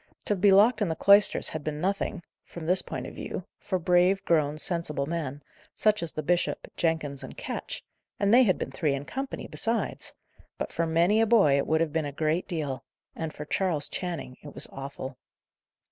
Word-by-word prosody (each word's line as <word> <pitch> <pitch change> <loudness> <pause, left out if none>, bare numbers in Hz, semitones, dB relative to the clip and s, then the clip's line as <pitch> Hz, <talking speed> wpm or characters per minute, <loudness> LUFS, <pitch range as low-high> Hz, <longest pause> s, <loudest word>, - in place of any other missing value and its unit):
To 205 - +2
be 195 +1 +5
locked 215 +4 +6
in 205 - +2
the 160 - -1
cloisters 200 +3 +5
had 155 -1 -5
been 150 0 -3
nothing 190 +1 -1 0.2
(from 170 -2 -9
this 180 +3 +3
point - - -5
of - - -8
view) - - -5
for 185 - -1
brave, 180 +2 +3
grown, 155 -3 +2
sensible 155 -4 -1
men, 145 -3 -4 0.3
such 215 0 +2
as 170 -2 -3
the 155 - -4
bishop, 175 +3 0
Jenkins, 160 -5 -1
and - - -9
Ketch - - -5 0.4
and 200 +1 +3
they 250 - +8
had 195 -8 +4
been - - -4
three 150 -6 0
in 140 +1 -5
company, 270 - -4
besides 230 0 -2 0.4
but - - -4
for 165 - 0
many 170 +7 +3
a 225 - +3
boy 205 -12 +5
it 140 - +1
would 160 0 +2
have 160 -3 0
been 160 -2 0
a 145 - -3
great 155 +4 0
deal; 145 -6 -3 0.3
and 160 -1 -3
for 150 - -7
Charles 160 -3 0
Channing 170 -8 -5
it 145 - -11
was - - -4
awful. 135 -1 -7
165 Hz, 200 wpm, -28 LUFS, 150-195 Hz, 0.4 s, they